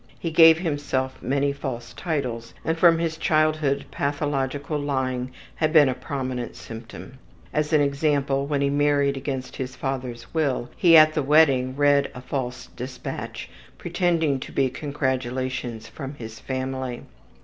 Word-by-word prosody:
He 165 - -4
gave 160 0 +8
himself 145 -5 -2
many 140 +2 0
false 130 -4 -6
titles, 125 -9 -3
and 160 - +1
from 165 0 +5
his 165 -1 -2
childhood 155 -3 +1
pathological 145 0 -2
lying 130 -3 -1 0.3
had 155 -1 +1
been 155 -3 +7
a 130 - +1
prominent 130 -1 -4
symptom. 115 +3 -10 0.3
As 150 +1 0
an 155 -2 +4
example, 140 -1 +1
when 145 -1 0
he 140 - +2
married 145 -1 +2
against 135 -2 -5
his 130 0 -5
father's 125 -3 -5
will, 140 -6 0
he 165 -2 +7
at 155 0 +7
the 155 - 0
wedding 135 -3 +4
read 145 0 +3
a 125 - -7
false 125 -1 -4
dispatch, 125 +1 -6 0.3
pretending 170 -4 +1
it - - -10
to - - -7
be 130 -2 +1
congratulations 130 -4 -3
from 140 -1 -7
his 115 -3 -9
family. 130 -1 -4
140 Hz, 150 wpm, -24 LUFS, 130-150 Hz, 0.3 s, gave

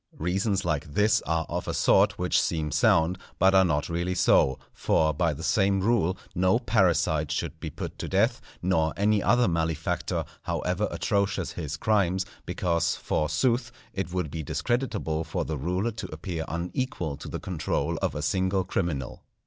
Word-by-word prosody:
Reasons 95 +4 0
like 75 -3 -2
this 105 +1 +3
are 80 -1 0
of - - -4
a - - -2
sort - - +4
which - - +2
seem 75 -2 -1
sound, 85 +3 +3 0.2
but 95 +2 +4
are 95 0 +6
not 75 -4 0
really 85 +2 -2
so; 65 -6 +4 0.2
for, 80 -1 +2
by 85 +3 +1
the 70 - -6
same 95 0 +2
rule, 95 -3 +1 0.2
no 95 +4 +3
parricide 90 - +2
should 75 - -3
be - - -5
put - - -7
to - - -4
death, - - +2 0.2
nor 80 -3 +1
any 105 +1 +3
other 120 +3 +3
malefactor, 80 -2 -1 0.2
however 90 +4 -1
atrocious 100 -1 0
his 80 -3 -5
crimes; 95 -1 +1 0.2
because, 85 -1 0
forsooth, 80 - 0 0.2
it 85 - -3
would 90 -5 -2
be 80 - -4
discreditable 105 - -1
to 80 +2 -3
the 80 - -3
ruler 90 - -1
to 110 - -7
appear 80 +1 -4
unequal 85 - -3
to - - -9
the - - -4
control 85 -5 -2
of - - -1
a 75 - -3
single 95 +4 +1
criminal. 85 -8 -3
90 Hz, 165 wpm, -27 LUFS, 80-100 Hz, 0.2 s, are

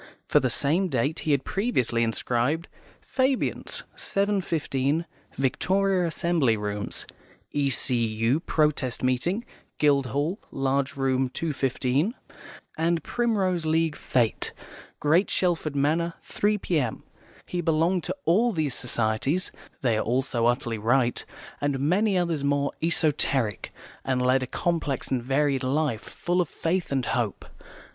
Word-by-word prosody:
For - - +5
the - - +1
same 170 +7 +1
date 140 +1 0
he 155 - -1
had 140 -2 +2
previously 160 - 0
inscribed, 120 +7 0 0.3
"Fabians, 260 -1 -1
7.15, 165 -7 0 0.3
Victoria 185 +7 +1
Assembly 160 -8 +1
Rooms," 105 0 -3 0.5
"E.C.U. 125 -3 +1
Protest 150 -8 0
Meeting, 170 - 0 0.3
Guildhall, 145 - +1
large 135 +1 0
room, 135 -1 +1
2.15," 140 - 0 0.7
and 165 0 +1
"Primrose 195 -8 0
League 160 -1 +2
Fête, 120 -4 0 0.5
Great 165 +7 +3
Shelford 170 -5 0
Manor, 160 +4 +1
3 210 +1 0
p.m." 150 - -1 0.4
He 180 - -2
belonged 165 +2 +2
to - - -2
all 225 +8 +4
these 155 -6 0
societies 125 - 0 0.3
(they 115 -4 +2
are - - 0
all 125 +4 +1
so 120 -3 0
utterly 120 -2 0
right) 120 +3 +2 0.4
and 145 -2 0
many 185 +8 +2
others 170 -5 0
more 140 0 +1
esoteric, 145 - +1 0.3
and 130 -1 0
led 130 +1 +3
a 130 - -3
complex 160 -3 -1
and 130 -2 +1
varied 135 +1 +1
life, 130 -3 0
full 175 +1 -1
of 170 - -2
faith 175 0 -1
and 135 -3 0
hope. 115 -5 -1
145 Hz, 125 wpm, -26 LUFS, 130-170 Hz, 0.7 s, For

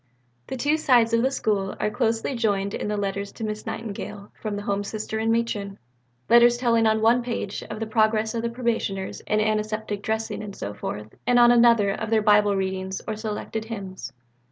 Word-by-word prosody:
The 265 - -4
two 290 +5 +2
sides 240 -6 +3
of 230 - +4
the 260 - +2
School 205 -7 -1
are 210 - 0
closely 225 +2 0
joined 200 -4 0
in - - -3
the 210 0 -1
letters 200 0 -3
to 225 - -8
Miss 215 0 -4
Nightingale 210 -2 -6
from 215 -2 -3
the 205 - -5
Home 200 0 -1
Sister 215 +1 -4
and 225 +1 +1
Matron 210 -4 -1 0.5
letters 240 0 +6
telling 230 -2 +3
on 220 0 +2
one 235 +2 +5
page 235 -4 -4
of 215 - -5
the 225 - -2
progress 220 0 +1
of 230 - -1
Probationers 225 -5 -2
in 215 - +2
antiseptic 215 -1 -1
dressing 220 0 -2
and 205 -2 -7
so 100 - -5
forth, 105 +1 -6
and 245 - +4
on 240 0 +7
another 235 -4 +5
of 220 +2 -4
their 220 -1 +2
Bible 210 -1 +4
readings 190 0 -2
or 220 - -2
selected 220 0 -4
hymns. 200 -5 -7
215 Hz, 195 wpm, -24 LUFS, 205-230 Hz, 0.5 s, on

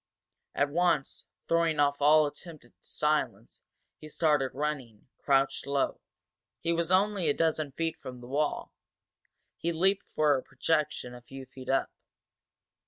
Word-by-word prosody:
At 140 0 +1
once, 170 -4 0 0.2
throwing 165 -2 +2
off 145 0 +2
all 155 +1 +6
attempt 150 -1 -8
at 120 - -22
silence, - - -2 0.4
he 155 - -10
started 150 -4 +2
running, 135 -7 -4
crouched 135 -1 +1
low. 140 -1 0 0.6
He 170 +1 0
was 170 0 -1
only 190 -2 +2
a 145 - +2
dozen 155 -3 0
feet 165 +1 -2
from 125 -1 -8
the 120 - -11
wall 145 +3 -1 0.8
he 170 - -1
leaped 190 +4 +1
for 150 -2 +2
a 130 - -1
projection 140 -2 -1
a 125 - -11
few 135 +2 -10
feet 130 0 -11
up. 135 - +1
150 Hz, 145 wpm, -29 LUFS, 135-165 Hz, 0.8 s, all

